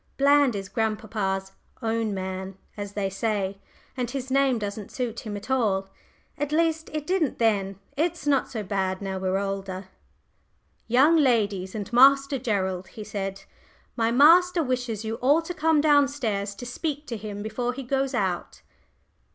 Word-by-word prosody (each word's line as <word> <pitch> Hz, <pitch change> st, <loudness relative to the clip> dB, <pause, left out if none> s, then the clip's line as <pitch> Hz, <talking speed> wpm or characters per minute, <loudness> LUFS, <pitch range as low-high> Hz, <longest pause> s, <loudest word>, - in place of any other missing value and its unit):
Bland 280 Hz, -3 st, +4 dB
is 195 Hz, -1 st, -4 dB
grandpapa's 210 Hz, -4 st, -2 dB, 0.3 s
"own 225 Hz, -1 st, 0 dB
man," 190 Hz, 0 st, -5 dB, 0.2 s
as 205 Hz, -1 st, -6 dB
they 205 Hz, -1 st, -1 dB
say, 195 Hz, -1 st, -2 dB, 0.4 s
and 250 Hz, -3 st, -2 dB
his 265 Hz, 0 st, -5 dB
name 270 Hz, -2 st, +3 dB
doesn't 205 Hz, -1 st, -5 dB
suit 240 Hz, -3 st, -3 dB
him 210 Hz, -2 st, -5 dB
at 205 Hz, +6 st, -8 dB
all 200 Hz, -7 st, +1 dB, 0.5 s
at 290 Hz, 0 st, -2 dB
least, 320 Hz, 0 st, +1 dB
it 305 Hz, -1 st, -3 dB
didn't 355 Hz, -6 st, 0 dB
then 200 Hz, -4 st, +1 dB, 0.2 s
he's 320 Hz, +2 st, -1 dB
not 280 Hz, -2 st, +2 dB
so 220 Hz, -4 st, -4 dB
bad 190 Hz, -1 st, -1 dB
now 190 Hz, -1 st, -4 dB
we're 185 Hz, 0 st, 0 dB
older. 195 Hz, -1 st, -4 dB, 1.0 s
"Young 275 Hz, +8 st, +5 dB
ladies 210 Hz, -9 st, +1 dB
and 210 Hz, +2 st, -5 dB
Master 275 Hz, +2 st, +6 dB
Gerald," 190 Hz, -6 st, -1 dB
he 215 Hz, -, -9 dB
said, 195 Hz, -2 st, -5 dB, 0.5 s
"my 230 Hz, -1 st, +1 dB
master 335 Hz, +7 st, +6 dB
wishes 245 Hz, -5 st, -2 dB
you 225 Hz, +1 st, -3 dB
all 285 Hz, +7 st, +3 dB
to 355 Hz, -, -5 dB
come 320 Hz, -2 st, +3 dB
down 290 Hz, -2 st, +5 dB
stairs 215 Hz, -8 st, -3 dB
to 245 Hz, -, -8 dB
speak 295 Hz, +4 st, -4 dB
to 240 Hz, -, -5 dB
him 205 Hz, -1 st, -6 dB
before 240 Hz, +3 st, -2 dB
he 270 Hz, +1 st, -6 dB
goes 270 Hz, +1 st, -1 dB
out." 185 Hz, -5 st, -2 dB
225 Hz, 160 wpm, -26 LUFS, 200-275 Hz, 1.0 s, Master